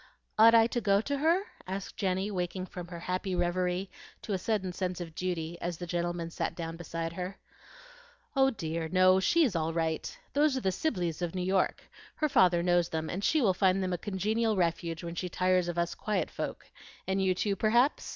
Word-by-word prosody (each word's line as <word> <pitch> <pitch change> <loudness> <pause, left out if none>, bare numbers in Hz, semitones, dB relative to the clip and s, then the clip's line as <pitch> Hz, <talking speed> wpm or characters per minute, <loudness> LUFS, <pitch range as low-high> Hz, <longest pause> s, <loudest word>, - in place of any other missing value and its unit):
"Ought 230 +1 +8
I 225 -1 +7
to 240 +1 -1
go 200 -2 +3
to 280 +6 -2
her?" 335 +6 +3 0.2
asked 190 +1 -5
Jenny, 190 +1 -1
waking 185 0 -3
from 180 -2 -8
her 170 -1 -8
happy 185 +1 -2
reverie 180 +1 0 0.4
to 210 - -3
a - - +1
sudden 190 -3 -1
sense 180 0 -3
of 170 -2 -6
duty 170 -1 -3
as 175 -1 -3
the 175 - -5
gentleman 175 -1 -2
sat - - -3
down 165 -1 -5
beside 165 0 -4
her. 185 +2 -5 1.0
"Oh 270 0 +5
dear, 165 -7 -3
no, 185 +1 +5
she 335 - +3
is 235 - +1
all 165 0 0
right. 160 - -2 0.2
Those 290 -1 +3
are - - -2
the 190 - +1
Sibleys 180 - -2
of 175 0 -2
New 180 -1 -1
York. 190 0 +1 0.3
Her 305 - 0
father 175 -8 +4
knows 175 -1 +2
them, 160 0 -3
and 190 +3 -4
she 310 +3 +3
will 195 -4 +4
find 190 0 +2
them 185 -1 -1
a - - 0
congenial 215 +3 0
refuge 170 -2 -1
when 170 0 -5
she 180 +1 -3
tires 185 0 +2
of 175 0 -3
us 170 0 0
quiet 215 -1 -2
folk; - - -6 0.4
and 190 0 +1
you 185 -1 +2
too, 200 +2 0
perhaps?" 235 +7 +2
185 Hz, 210 wpm, -30 LUFS, 175-205 Hz, 1.0 s, Ought